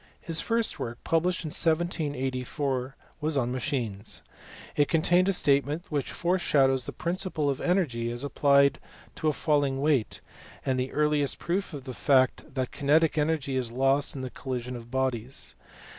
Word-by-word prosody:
His 165 -2 -1
first 230 -1 0
work, 115 0 -4
published 175 +2 +1
in 155 - -4
1784, 140 -5 -1 0.3
was 150 -1 +1
on 125 -2 0
machines: 120 - -3 0.5
it 145 - +3
contains 175 +3 +3
a - - +5
statement 145 +1 +1
which 145 -3 -1
foreshadows 140 -8 +2
the - - -3
principle 170 -4 -1
of 135 - -4
energy 140 -11 0
as 120 +2 -4
applied 140 0 +3 0.3
to 155 - -3
a - - +4
falling 145 -3 +1
weight, 140 -6 +1 0.5
and 130 -1 +1
the 130 +1 -2
earliest 150 -2 +2
proof 190 +3 -2
of 145 -4 -7
the 130 -1 -7
fact 130 +1 +2
that 130 -2 -2
kinetic 150 +3 +2
energy 150 -3 0
is 125 -3 0
lost 135 +4 +2
in 135 - -5
the 130 - -5
collision 125 -2 -5
of 120 -1 -9
bodies. 130 -1 -2
140 Hz, 160 wpm, -27 LUFS, 130-160 Hz, 0.5 s, a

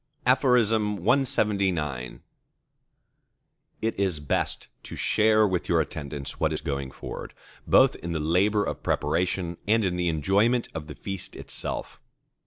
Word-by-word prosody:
CLXXX 105 - +1 1.6
It 115 -3 -1
is 95 -6 0
best 75 - -2
to - - -9
share 110 0 +3
with 90 -3 -2
your 85 - +4
attendants 70 -3 -5
what 80 - +1
is 75 - -3
going 70 -3 -3
forward, - - -8 0.3
both - - +5
in 85 - -6
the 80 - -1
labour 95 +7 +2
of - - -4
preparation 90 -1 -1
and 110 0 +3
in 90 -1 -1
the 90 -1 +1
enjoyment 100 - +2
of 80 -2 -6
the - - -8
feast 95 -2 -5
itself. - - -5
90 Hz, 130 wpm, -26 LUFS, 80-105 Hz, 1.6 s, both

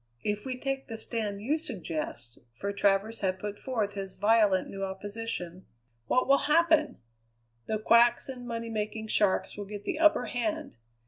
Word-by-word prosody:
If 210 +4 -2
we 255 -1 -3
take 270 0 -3
the 225 - -6
stand 215 -3 -3
you 300 +7 +1
suggest" 155 - -4 0.2
for 200 +7 -3
Travers 200 +3 +2
had 190 -1 0
put 205 +2 -6
forth 220 -6 -2
his 195 -1 -5
violent, 205 -2 +4
new 195 0 -6
opposition 190 -2 -5 0.4
"what 255 - +2
will 275 +1 +5
happen? 320 -1 +4 0.7
The 220 - 0
quacks 235 +2 +4
and 250 -2 -7
money 230 -1 -4
making 220 0 -3
sharks 205 -3 +2
will 205 - -5
get 205 0 -7
the 330 -5 -3
upper 310 -6 +5
hand. 310 +4 -3
220 Hz, 165 wpm, -29 LUFS, 200-250 Hz, 0.7 s, will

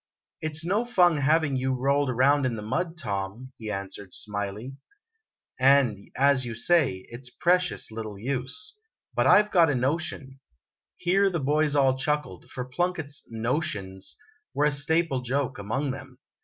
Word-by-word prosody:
" - - -60
It 155 -1 -3
's 160 +2 -1
no 205 +6 +1
fun 180 -9 +4
having 145 0 +2
you 130 +1 0
rolled 140 +2 +1
around 130 +2 +3
in 120 - -2
the 105 - -6
mud, 165 +10 -2
Tom," 105 - -4
he 110 -2 -6
answered, 100 -1 -6
smiling; 105 +5 -5 0.8
"and, 130 -6 +3
as 140 -1 +4
you 120 -2 -4
say, 115 - +2
it 120 +3 -9
's 125 - -5
precious 180 0 +1
little 110 -2 -6
use. 135 - -4 0.3
But - - +2
I - - +8
Ve 210 - -14
got 170 -4 +5
a 145 - +1
notion 135 0 -2 0.6
Here 195 +3 +3
the 175 -3 -2
boys 150 +1 +1
all 135 -2 +4
chuckled, 150 - -2
for 125 - -5
Plunkett's 155 +1 -2
"notions" 115 -5 -3 0.4
were 145 - +3
a 150 - +3
staple 145 0 +1
joke 130 -1 -2
among 130 +8 -2
them. 130 -1 -9
135 Hz, 165 wpm, -27 LUFS, 115-155 Hz, 0.8 s, I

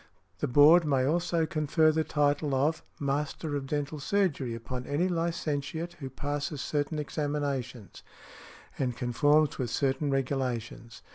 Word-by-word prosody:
The - - 0
Board 150 +7 +7
may 135 -4 +2
also 165 +2 +1
confer 155 0 +2
the 160 0 +1
title 145 -1 +1
of 150 +5 +1 0.2
"Master 145 +2 -2
of 135 -1 -3
Dental 145 +1 -2
Surgery" 145 -8 0
upon 125 +2 -6
any 150 +6 +1
licentiate 165 -2 -2
who 135 -3 -5
passes 145 +2 -3
certain 145 +2 -2
examinations 140 - -3 0.8
and 125 -2 0
|162| - - -18
conforms 145 +5 +2
with 125 -2 -1
certain 140 +4 0
regulations. 130 -4 -3
145 Hz, 135 wpm, -29 LUFS, 135-155 Hz, 0.8 s, Board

